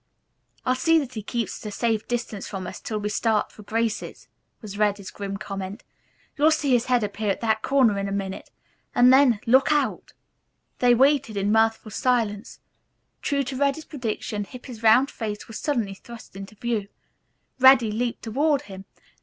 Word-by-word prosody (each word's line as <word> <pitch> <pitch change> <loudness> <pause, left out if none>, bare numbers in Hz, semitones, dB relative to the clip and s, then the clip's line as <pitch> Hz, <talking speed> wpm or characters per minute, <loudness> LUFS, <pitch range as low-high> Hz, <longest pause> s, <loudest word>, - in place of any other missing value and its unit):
"I'll 255 - +3
see 325 +6 +3
that 275 -5 -2
he 220 - -5
keeps 225 0 -4
at 210 - -4
a - - -8
safe 225 0 -1
distance 235 -4 -3
from 190 -2 -6
us - - -7
till 215 - -4
we 210 0 -2
start 215 0 0
for - - -14
Grace's," 225 +1 -3 0.3
was 210 -3 -9
Reddy's 205 -2 0
grim 200 -1 -5
comment. 195 0 -6 0.5
"You'll 300 +1 +4
see 310 -3 +1
his 245 -1 +3
head 250 -3 +2
appear 205 +1 -2
at 195 - 0
that 220 -1 +1
corner 250 -7 +3
in 195 - -2
a - - -4
minute, 195 -1 -4 0.5
and 250 +1 +6
then, 260 -5 +5
look 260 +4 +4
out!" 295 -1 -1 0.7
They 245 -1 +5
waited 270 -3 +2
in 200 +1 +1
mirthful 220 0 +2
silence. 225 -2 -1 0.6
True 280 -1 0
to 260 +1 -5
Reddy's 280 +3 0
prediction 220 -5 -4
Hippy's 245 +1 -10
round 235 +5 +5
face 210 -2 -5
was 225 - -7
suddenly 235 -10 -1
thrust 230 +1 -13
into 195 +2 -9
view. 220 -2 -2 0.7
Reddy 260 -4 +6
leaped 235 +2 -2
toward 285 +5 +1
him. 190 -4 -10
225 Hz, 175 wpm, -24 LUFS, 210-255 Hz, 0.7 s, and